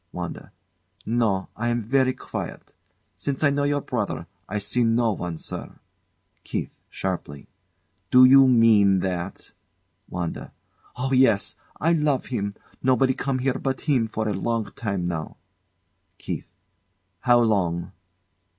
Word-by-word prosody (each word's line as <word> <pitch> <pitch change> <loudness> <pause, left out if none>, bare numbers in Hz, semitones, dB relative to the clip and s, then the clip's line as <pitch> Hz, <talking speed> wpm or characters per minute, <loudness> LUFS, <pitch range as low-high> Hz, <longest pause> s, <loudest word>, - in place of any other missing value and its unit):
WANDA. - - -6 0.5
No; 110 -5 0
I 120 +2 -2
am 120 -1 0
verree 130 +3 +2
quiet. - - -7 0.4
Since 135 +10 -3
I 145 - +5
know 140 0 +1
your 145 0 +1
brother, 100 -12 -3 0.2
I 105 - -2
see 105 +4 0
no 115 0 +3
one, 90 -4 -4
sare. - - -7 0.6
KEITH. - - -3 0.2
[Sharply] 85 -7 -4 0.6
Do 130 0 +8
you 135 +1 +8
mean 110 -6 +5
that? 90 0 -4 0.6
WANDA. 90 -2 -5 0.4
Oh, 130 +2 -2
yes! 125 -6 +3 0.2
I 165 +3 +3
love 150 -4 +1
him. 100 -3 -2 0.3
Nobody 130 0 +3
come 135 0 -2
here 130 0 0
but 135 -1 -2
him 130 -7 +2
for 110 0 -3
a 105 - 0
long 115 +3 -1
time 100 -5 -3
now. 80 -3 -4 0.8
KEITH. - - -5 0.7
How 120 +1 +4
long? 90 -7 +1
115 Hz, 130 wpm, -24 LUFS, 95-130 Hz, 0.8 s, Do